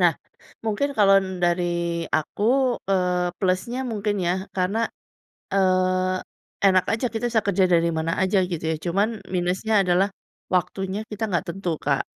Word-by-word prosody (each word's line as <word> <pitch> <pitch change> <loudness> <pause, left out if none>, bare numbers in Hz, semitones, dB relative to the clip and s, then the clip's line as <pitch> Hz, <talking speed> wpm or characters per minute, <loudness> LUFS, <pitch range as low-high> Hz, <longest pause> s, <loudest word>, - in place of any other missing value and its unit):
Nah, - - +5 0.5
mungkin 225 +6 0
kalau 195 -2 +6
n 185 -1 -6
dari 175 +1 +2 0.5
aku, 155 +6 -1 0.5
eee, 180 -2 +1
plusnya 190 +7 0
mungkin 210 -1 -1
ya, 175 0 +1 0.2
karena, 200 +5 0 0.7
eee, 185 -1 +2 0.5
enak 185 -1 +5
aja 225 +3 0
kita 225 +1 -3
bisa 225 -1 +3
kerja 195 -1 +3
dari 170 -1 +4
mana 160 +1 -1
aja 190 +1 +3
gitu 175 -3 -4
ya. - - 0
Cuman 200 +7 -1
minusnya 185 +4 +1
adalah 185 +2 +2 0.4
waktunya 190 +2 -1
kita 210 +1 -5
enggak 175 - 0
tentu, 175 -3 -3
Kak. - - 0
185 Hz, 150 wpm, -24 LUFS, 180-205 Hz, 0.7 s, kalau